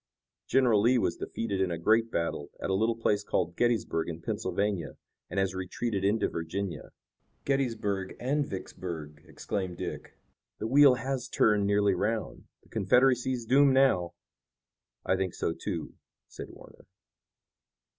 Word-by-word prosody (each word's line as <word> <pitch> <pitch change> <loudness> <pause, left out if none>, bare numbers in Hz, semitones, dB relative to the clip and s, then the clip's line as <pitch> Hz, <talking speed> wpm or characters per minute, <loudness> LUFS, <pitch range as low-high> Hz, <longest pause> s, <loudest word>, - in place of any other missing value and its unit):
"General 125 -6 +4
Lee 125 +4 +4
was - - 0
defeated 100 -4 -3
in 95 - +1
a 85 - -2
great 110 +7 +3
battle 85 -6 -2
at - - -2
a - - +2
little 110 +4 +1
place 105 -2 0
called 90 -3 -1
Gettysburg 115 -9 0
in 80 -1 -5
Pennsylvania, 100 -3 -2 0.3
and - - -2
has 95 -2 0
retreated 95 +3 -3
into 105 +3 +2
Virginia." 85 +1 -4 0.6
"Gettysburg 110 -8 -1
and 145 +4 0
Vicksburg!" 80 - -7
exclaimed 95 -3 -4
Dick. - - -6 0.4
"The - - -4
wheel 135 +2 +6
has 130 +1 -3
turned 105 -2 +3
nearly 100 -1 +3
'round. 110 +5 -2 0.2
The - - -24
Confederacy 125 +5 +3
is 120 -2 -4
doomed 135 +2 +5
now." 130 -11 +3 0.9
"I - - +2
think 95 -2 -2
so, 80 - -1
too," 85 -2 -5 0.3
said - - -9
Warner. - - -16
105 Hz, 145 wpm, -29 LUFS, 95-120 Hz, 0.9 s, wheel